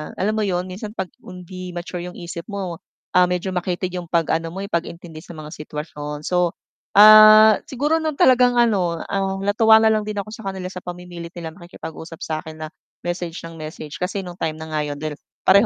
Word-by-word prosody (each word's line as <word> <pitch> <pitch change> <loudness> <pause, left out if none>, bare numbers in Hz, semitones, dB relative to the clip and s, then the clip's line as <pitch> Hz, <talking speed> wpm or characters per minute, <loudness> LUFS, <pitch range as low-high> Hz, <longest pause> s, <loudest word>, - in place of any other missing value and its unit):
alam 205 +3 0
mo 215 - +1
yun? 180 -2 0
Minsan 210 +3 -7
'pag 190 -2 -3
hindi 180 0 -9
mature 175 +1 -5
'yong 180 - -8
isip 170 -1 -7
mo, 190 -5 -4 0.3
ah, 180 0 +5
medyo 180 +1 -2
makitid 180 0 -2
yung 180 -2 -5
pag-ano 165 -1 +1
mo 190 - -5
eh, 200 - -6
pag-intindi 170 -1 -4
sa 175 - -10
mga 155 0 -9
sitwasyon 150 -1 -6
so, 180 -1 +1 0.4
ah, 215 +1 +9
siguro 295 +5 +1
'no 315 -1 -1
talagang 250 -2 +5
ano, 190 -8 +2
ah, 195 -1 -1
natuwa 220 +2 +5
na 220 - +5
lang 215 -1 +1
din 210 - -3
ako 215 - -11
sa 220 -2 -8
kanila 190 -1 -4
sa 180 - -6
pamimilit 175 -1 -8
nilang 165 +1 -7
makikipag-usap 165 -1 -9
sa 160 - -3
akin 155 -1 -9
na - - -4 0.4
message 175 -1 -4
nang 165 -1 -9
message 155 -1 -8
kasi 190 +2 -2
nung 175 0 -9
time 155 -1 -1
na 160 0 -8
nga 155 -1 0
'yon 145 - -4
dahil 155 -1 -4 0.2
pareho 200 +4 +6
180 Hz, 205 wpm, -22 LUFS, 165-200 Hz, 0.4 s, ah